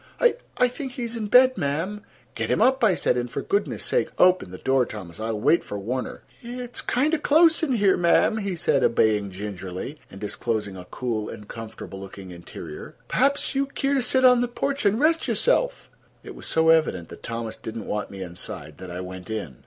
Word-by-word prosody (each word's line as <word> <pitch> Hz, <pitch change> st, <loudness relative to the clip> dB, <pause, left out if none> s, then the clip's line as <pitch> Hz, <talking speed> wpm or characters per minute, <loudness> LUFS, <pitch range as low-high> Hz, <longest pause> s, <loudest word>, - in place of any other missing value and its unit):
"I—I 485 Hz, -, +2 dB
think 255 Hz, +1 st, -6 dB
he's 240 Hz, -3 st, -4 dB
in 220 Hz, -2 st, -3 dB
bed, 255 Hz, +3 st, +6 dB
ma'm." 165 Hz, +9 st, -2 dB, 0.3 s
"Get -, -, -3 dB
him -, -, +2 dB
up," 260 Hz, -1 st, +3 dB
I 200 Hz, -5 st, +5 dB
said, -, -, +1 dB
"and 120 Hz, 0 st, -2 dB
for -, -, -4 dB
goodness' 400 Hz, +1 st, -1 dB
sake -, -, +1 dB
open 180 Hz, -, +4 dB
the 90 Hz, -, -8 dB
door, 130 Hz, +3 st, +2 dB
Thomas. 95 Hz, -7 st, -8 dB
I'll 110 Hz, -1 st, -2 dB
wait 165 Hz, +9 st, +3 dB
for 105 Hz, -, -5 dB
Warner." 125 Hz, +6 st, -4 dB, 0.2 s
"It's 245 Hz, 0 st, -5 dB
kind 285 Hz, +6 st, +1 dB
o' 325 Hz, -, +2 dB
close 320 Hz, +2 st, +5 dB
in 305 Hz, -5 st, +1 dB
here, 200 Hz, -5 st, +4 dB
ma'm," 175 Hz, +5 st, +3 dB
he 200 Hz, -4 st, -2 dB
said, 145 Hz, -4 st, +1 dB
obeying 105 Hz, -3 st, +3 dB
gingerly, 95 Hz, -, -6 dB
and 95 Hz, -, -11 dB
disclosing 105 Hz, -1 st, -3 dB
a 90 Hz, -1 st, -9 dB
cool 110 Hz, +1 st, -3 dB
and 105 Hz, -, -9 dB
comfortable 110 Hz, -4 st, -8 dB
looking 95 Hz, -1 st, -9 dB
interior. 85 Hz, -3 st, -9 dB
"Perhaps 275 Hz, +2 st, +1 dB
you'd 275 Hz, 0 st, -1 dB
keer 275 Hz, +1 st, +1 dB
to 275 Hz, -, +2 dB
set 260 Hz, +1 st, +3 dB
on 250 Hz, -1 st, +7 dB
the 245 Hz, -, +1 dB
porch 275 Hz, 0 st, -1 dB
an' 200 Hz, +2 st, +2 dB
rest 320 Hz, +5 st, +2 dB
yo'self." -, -, +1 dB, 0.4 s
It -, -, -9 dB
was -, -, -9 dB
so 160 Hz, 0 st, +3 dB
evident 155 Hz, -, +3 dB
that -, -, -11 dB
Thomas 115 Hz, -1 st, -4 dB
did 110 Hz, -, -7 dB
not 110 Hz, -, -5 dB
want 105 Hz, 0 st, -3 dB
me 95 Hz, -1 st, -6 dB
inside 80 Hz, -4 st, -7 dB
that 95 Hz, -1 st, -8 dB
I 90 Hz, +1 st, -5 dB
went 90 Hz, +2 st, -8 dB
in. 100 Hz, -, -4 dB
145 Hz, 205 wpm, -25 LUFS, -, 0.4 s, on